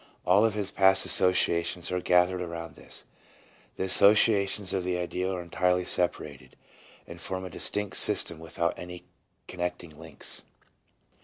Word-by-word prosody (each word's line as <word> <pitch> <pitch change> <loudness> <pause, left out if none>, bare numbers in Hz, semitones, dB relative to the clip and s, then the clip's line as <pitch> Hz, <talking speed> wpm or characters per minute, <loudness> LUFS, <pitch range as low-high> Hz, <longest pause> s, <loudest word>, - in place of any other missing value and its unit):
1 90 - +2
All 105 - +4
of 110 -2 -1
his 100 -2 -3
past 95 0 +5
associations 85 -1 +3
are 90 0 -2
gathered 90 +1 +1
around 85 -2 -8
this; - - -10 0.7
the - - -4
associations 100 0 +3
of 95 -2 -2
the 90 0 -3
ideal 90 +1 -4
are 90 -2 -5
entirely 90 +1 -1
separated, 75 -6 -3 0.5
and 85 0 -11
form 95 +2 -5
a 90 - -9
distinct 105 +3 -1
system 85 - +2
without 85 +1 -3
any 90 0 -10 0.4
connecting 90 -2 -6
links. - - -9
90 Hz, 145 wpm, -26 LUFS, 85-95 Hz, 0.7 s, past